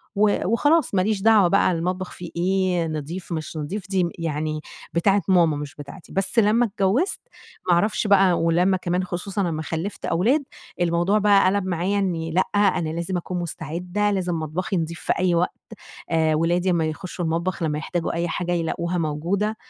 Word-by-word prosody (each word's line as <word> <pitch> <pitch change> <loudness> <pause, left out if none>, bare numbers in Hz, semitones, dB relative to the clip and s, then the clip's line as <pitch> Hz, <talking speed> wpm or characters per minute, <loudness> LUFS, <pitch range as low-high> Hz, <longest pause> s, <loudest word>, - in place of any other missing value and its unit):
و 205 0 +2
وخلاص 290 - +2
ماليش 195 +2 +1
دعوة 215 -3 +5
بقى 195 +1 +3
المطبخ 180 +2 -2
فيه 175 -1 -8
إيه، 180 -1 +1
نضيف 160 +4 -5
مش 160 -1 -4
نضيف 185 +6 -5
دي 185 -3 +1
يعني 155 -1 -2 0.3
بتاعة 195 +4 +3
ماما 170 -5 +4
مش 145 -1 -7
بتاعتي، 145 +4 -11
بس 195 +4 +1
لمّا 225 +3 +4
اتجوّزت 215 - 0 0.5
ما 180 - +5
أعرفش 210 +5 +1
بقى 195 -2 +5
ولمّا 175 +3 +3
كمان 180 0 -1
خصوصًا 185 +1 -2
أمّا 155 -1 -3
خلّفت 165 +5 -4
أولاد، 245 - +2 0.4
الموضوع 175 +4 +2
بقى 205 -2 +4
قَلَب 195 +1 +2
معايا 185 +3 0
إني 165 -4 -1
لأ 180 +3 +3
أنا 195 -5 +2
لازم 170 +3 -2
أكون 180 +1 -4
مستعدة، 175 +5 -2
لازم 180 -3 -1
مطبخي 180 +6 -2
نضيف 165 0 -3
في - - +1
أي 180 -2 +2
وقت 175 +2 +1 0.6
آآ، 160 -1 +2
ولادي 175 +4 +1
أما 170 -2 +1
يخشوا 175 +3 -5
المطبخ 170 +3 -1
لمّا 150 -2 0
يحتاجوا 165 +2 -2
أي 170 +1 -1
حاجة 175 0 -2
يلاقوها 170 +1 -1
موجودة، 175 +8 -1
180 Hz, 170 wpm, -23 LUFS, 165-195 Hz, 0.6 s, دعوة